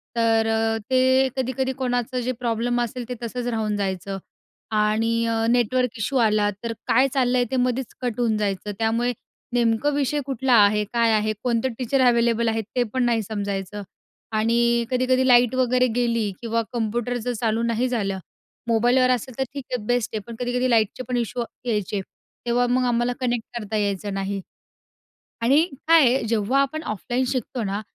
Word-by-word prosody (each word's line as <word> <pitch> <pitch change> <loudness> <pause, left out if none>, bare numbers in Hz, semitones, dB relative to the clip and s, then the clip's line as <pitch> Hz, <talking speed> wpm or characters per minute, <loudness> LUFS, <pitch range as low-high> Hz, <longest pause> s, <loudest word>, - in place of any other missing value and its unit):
तर 225 -1 +2
अ, 225 0 +1
ते 260 +1 +4
कधी-कधी 260 0 -1
कोणाचं 245 0 -1
जे - - +2
प्रॉब्लेम 240 +1 0
असेल, 240 0 -4
ते 250 - -3
तसंच 245 +1 -4
राहून 220 -3 -1
जायचं 195 0 -3 0.6
आणि 220 +2 +1
अ, 225 0 0
नेटवर्क 245 0 +1
इशू 265 +5 -2
आला, 210 -1 +2
तर 230 -1 -3 0.2
काय 260 +4 +4
चाललं 255 -1 +2
आहे 245 - +3
ते 260 - 0
मध्येच 250 0 -4
कट 245 -2 -3
होऊन 225 -3 +2
जायचं. 205 0 -2
त्यामुळे 230 +2 +1 0.4
नेमकं 240 +4 +2
विषय 290 +1 0
कुठला 265 -1 -1
आहे? 210 +1 +1
काय 230 -1 +3
आहे? 215 0 +2
कोणते 245 0 +1
टीचर 260 +2 0
अव्हेलेबल 235 -1 +3
आहेत? 225 -1 -1
ते 245 - +3
पण 260 -1 0
नाही 230 -2 +2
समजायचं. 200 -1 -4 0.5
आणि 235 +2 +2
कधी-कधी 255 +1 +2
लाईट 245 0 +5
वगैरे 255 0 +3
गेली 230 -4 +1
किंवा 230 -1 -1
कंप्युटर 240 +1 -1
जर 245 - -1
चालू 225 0 0
नाही 235 +2 0
झालं. 200 -6 -1 0.5
मोबाईलवर 245 +3 +3
असेल 250 0 -1
तर 265 - +1
ठीक 280 -2 -5
आहे, 245 -4 -1
बेस्ट 245 -2 0
आहे, 215 - -1
पण 235 - -7
कधी-कधी 250 +1 0
लाईटचे 225 +2 +2
पण 250 - -1
इशू 240 +1 -2
वा - - 0 0.2
यायचे. 210 -2 -1 0.5
तेव्हा 245 +1 +2
मग 250 +1 +1
आम्हाला 240 +1 +1
कनेक्ट 240 -2 -1
करता 215 0 -4
यायचं 200 -1 -1
नाही. 195 0 -2 1.0
आणि 275 +7 +4 0.3
काय 330 -2 +7
आहे 255 +3 +2
जेव्हा 230 +4 +2
आपण 310 +3 -3
ऑफलाईन 240 - -2
शिकतो 255 -1 -3
ना, 200 +2 -2
235 Hz, 175 wpm, -23 LUFS, 220-250 Hz, 1.0 s, काय